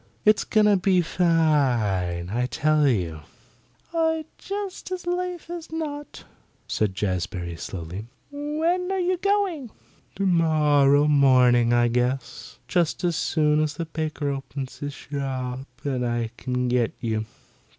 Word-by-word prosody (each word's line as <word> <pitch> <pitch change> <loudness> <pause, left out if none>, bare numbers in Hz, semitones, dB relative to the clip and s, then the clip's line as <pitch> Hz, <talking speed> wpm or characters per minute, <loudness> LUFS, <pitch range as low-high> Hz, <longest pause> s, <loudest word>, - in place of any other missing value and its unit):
It's 215 -1 +5
going 215 -1 +3
to 205 -1 +5
be 185 -1 +3
fine, 125 - +1
I 125 +3 0
tell 155 +1 +2
you." 90 - 0 0.7
"I'd 320 -1 +1
just 395 -2 -5
as 365 -1 -4
lief 355 -1 -2
as 340 -2 -7
not," 295 -3 -5 0.4
said 105 -3 -1
Jazbury 90 -3 -2
slowly. 90 +5 -6 0.2
"When 320 +6 -1
are 385 - 0
you 365 0 +1
going?" 380 - 0 0.5
"Tomorrow 150 -6 +4
morning, 125 -5 +5
I 120 0 +4
guess; 125 +1 -2
just 175 -1 0
as 175 -2 +1
soon 150 -1 +2
as 150 -1 -1
the 165 - -3
baker 155 -2 -3
opens 135 -1 -6
his 145 -1 -5
shop 130 -2 -4 0.2
and 130 -3 -1
I 120 -1 -1
can 125 0 -2
get 120 -2 +1
you." 110 -1 -2
145 Hz, 130 wpm, -25 LUFS, -, 0.7 s, It's